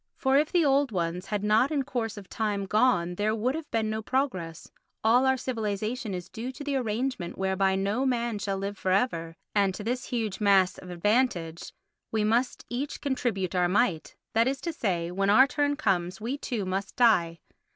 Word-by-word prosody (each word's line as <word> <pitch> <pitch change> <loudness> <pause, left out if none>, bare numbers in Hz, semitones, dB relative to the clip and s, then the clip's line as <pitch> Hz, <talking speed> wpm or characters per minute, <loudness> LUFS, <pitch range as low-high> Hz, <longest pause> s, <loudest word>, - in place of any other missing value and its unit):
For 265 0 +2
if 300 - 0
the 345 -3 +3
old 275 -2 +3
ones 175 -1 -2
had 205 -1 -2
not 215 +5 +3
in 290 -3 0
course 225 -4 -3
of 200 -2 -9
time 205 -3 -2
gone 195 -4 +2
there 210 +4 0
would 240 +4 0
have 320 0 -6
been 225 -1 0
no 220 0 -2
progress; 205 - -2 0.3
all 245 +4 +4
our 265 0 +3
civilisation 220 -2 -3
is 180 -1 -6
due 235 +6 -6
to 290 - -8
the 285 -1 -2
arrangement 235 -5 -2
whereby 190 0 +1
no 200 +6 0
man 235 -4 -1
shall 195 -1 -2
live 200 +1 -4
for 185 - -2
ever, 170 -5 0 0.2
and 200 -2 +2
to 210 - -6
this 250 +3 -2
huge 220 -4 -3
mass 195 -3 +4
of 180 - -11
advantage 175 -3 0 0.4
we 220 -1 +1
must 235 +4 0
each 265 +4 -4
contribute 235 - -1
our 180 -1 +2
mite; 185 -6 +1 0.2
that 230 +2 +3
is 270 +1 -1
to 335 - -3
say, 175 - -1
when 195 +2 0
our 255 +6 +7
turn 290 +1 0
comes 185 - 0
we 235 +5 -3
too 240 -8 -3
must 190 +1 -3
die. 175 -9 +3
215 Hz, 195 wpm, -27 LUFS, 190-255 Hz, 0.4 s, our